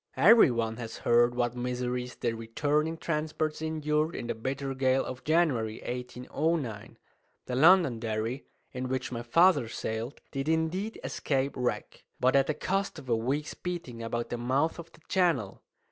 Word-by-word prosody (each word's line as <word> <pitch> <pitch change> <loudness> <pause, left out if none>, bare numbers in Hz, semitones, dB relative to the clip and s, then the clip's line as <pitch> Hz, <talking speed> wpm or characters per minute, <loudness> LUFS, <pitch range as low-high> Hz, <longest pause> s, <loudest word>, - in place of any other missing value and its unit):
Every 225 -6 +7
one 115 -2 -1
has 115 -2 -6
heard 120 +1 +3
what 120 0 0
miseries 125 0 -3
the 120 -2 -1
returning 145 +8 -1
transports 155 -1 -2
endured 155 0 0
in - - -4
the - - -1
bitter 135 +4 -3
gale 130 0 +2
of 130 - -7
January, 140 -10 +1
1809. 125 0 -3 0.5
The 125 - -3
Londonderry, 125 - +3 0.3
in 130 0 -4
which 130 0 -2
my 120 -1 -3
father 145 +1 +4
sailed, 110 +4 -4
did 135 +2 -2
indeed 165 +7 -1
escape 135 -1 -1
wreck, 120 -5 -3 0.2
but 130 +2 +3
at 135 -1 +4
the 155 - 0
cost 195 -1 -1
of 135 -4 -10
a 115 - +4
week's 135 +7 -2
beating 170 -10 -5
about 115 +1 -3
the 120 - -3
mouth 135 +8 0
of 165 0 -9
the - - -20
Channel. 165 - +1
130 Hz, 160 wpm, -29 LUFS, 120-155 Hz, 0.5 s, Every